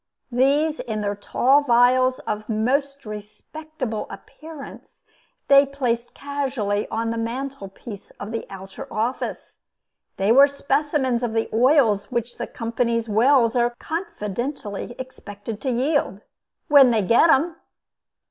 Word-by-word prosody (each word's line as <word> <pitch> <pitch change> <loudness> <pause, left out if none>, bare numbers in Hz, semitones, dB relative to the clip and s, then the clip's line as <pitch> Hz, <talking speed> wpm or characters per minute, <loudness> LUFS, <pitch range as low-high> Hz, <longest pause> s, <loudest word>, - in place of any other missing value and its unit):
These, 285 +5 +2
in 215 -2 -3
their 205 0 -2
tall 260 +7 +3
vials 255 0 +4
of 210 +1 -4
most 275 +6 -1
respectable 220 +4 -6
appearance, 310 -3 -12 0.4
they 275 0 +7
placed 250 -4 -3
casually 265 -8 -2
on 225 0 -2
the 230 - -3
mantel 250 -1 -4
piece 200 +1 -10
of 205 +2 -6
the 230 - -4
outer 195 0 -9
office. 230 +4 -3 0.6
They 195 +3 +2
were 275 +4 +8
specimens 280 -3 0
of 240 -3 -2
the 225 0 -1
oils 235 -4 +3
which 235 0 -3
the - - -3
company's 230 0 -2
wells 230 +2 +3
are 240 0 +1
confidently 240 - -5
expected 220 -4 -8
to 265 - -2
yield 255 -5 0 0.5
when 280 -3 +7
they 225 -3 +2
get 235 - +4
'em! 320 +3 +3
240 Hz, 130 wpm, -23 LUFS, 220-275 Hz, 0.6 s, were